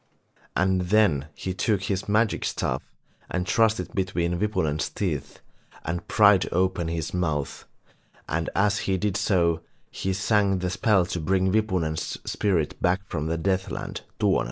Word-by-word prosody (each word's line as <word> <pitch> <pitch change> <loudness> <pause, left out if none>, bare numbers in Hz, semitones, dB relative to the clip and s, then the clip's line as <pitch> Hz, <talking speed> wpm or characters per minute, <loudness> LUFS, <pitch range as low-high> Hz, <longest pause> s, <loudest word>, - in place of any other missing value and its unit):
And 95 0 +2
then 95 -10 +3
he 95 - -4
took 100 +1 0
his 100 0 -2
magic 110 +1 +2
staff - - -1 0.5
and 90 -1 -2
thrust 110 +1 +3
it - - -5
between 90 -2 -1
Wipunen's 95 -8 0
teeth 75 -8 -3 0.4
and 85 +1 -3
prised 100 -3 +5
open 90 -1 +1
his 80 -1 -3
mouth, 80 -6 -2 0.6
and 85 +1 -1
as 100 +1 +2
he 95 - +2
did 100 0 -1
so, 85 -5 +2 0.3
he 95 - -2
sang 95 -1 +1
a - - 0
spell 100 -1 +3
to 85 - -3
bring 95 +3 +1
Wipunen's 90 -7 0
spirit 90 -7 0
back 90 +2 +2
from 75 +1 -2
the 80 +1 -1
Deathland, 95 +3 -2 0.2
Tuonela. - - +3
95 Hz, 150 wpm, -25 LUFS, 85-100 Hz, 0.6 s, prised